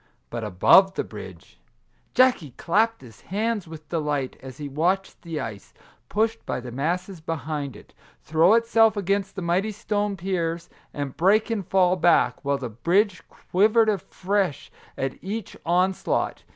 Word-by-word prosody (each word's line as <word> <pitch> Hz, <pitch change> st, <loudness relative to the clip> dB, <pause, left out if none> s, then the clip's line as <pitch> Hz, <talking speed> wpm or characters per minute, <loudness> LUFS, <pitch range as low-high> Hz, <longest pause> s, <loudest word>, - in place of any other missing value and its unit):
But 115 Hz, -1 st, -4 dB
above 110 Hz, -, +5 dB
the -, -, -1 dB
bridge! -, -, -11 dB, 0.6 s
Jackie 245 Hz, -, +3 dB
clapped 225 Hz, +6 st, +1 dB
his 115 Hz, -5 st, -15 dB
hands 210 Hz, 0 st, -2 dB
with 155 Hz, -1 st, -11 dB
delight, 150 Hz, -5 st, -1 dB
as 130 Hz, -1 st, -10 dB
he 145 Hz, -, -5 dB
watched 175 Hz, +7 st, -1 dB
the 165 Hz, -3 st, -5 dB
ice, 105 Hz, -3 st, -7 dB, 0.3 s
pushed 225 Hz, +2 st, 0 dB
by -, -, -3 dB
the 125 Hz, 0 st, -8 dB
masses 175 Hz, +7 st, -2 dB
behind 150 Hz, -3 st, -4 dB
it, -, -, -16 dB, 0.3 s
throw 165 Hz, +6 st, +4 dB
itself 225 Hz, -1 st, +4 dB
against 195 Hz, 0 st, -1 dB
the 190 Hz, -, -4 dB
mighty 180 Hz, +5 st, +1 dB
stone 205 Hz, -1 st, -2 dB
piers, 170 Hz, -2 st, -2 dB, 0.2 s
and 140 Hz, -2 st, -5 dB
break 205 Hz, -, +3 dB
and 205 Hz, -6 st, -2 dB
fall 185 Hz, -1 st, +3 dB
back, 175 Hz, -2 st, +3 dB
while 140 Hz, 0 st, +1 dB
the 130 Hz, -2 st, -5 dB
bridge 180 Hz, -, +1 dB
quivered 215 Hz, +4 st, +2 dB
afresh 195 Hz, -3 st, -1 dB, 0.3 s
at 135 Hz, 0 st, -4 dB
each 205 Hz, +2 st, -5 dB
onslaught. 185 Hz, +2 st, 0 dB
180 Hz, 150 wpm, -24 LUFS, 150-205 Hz, 0.6 s, above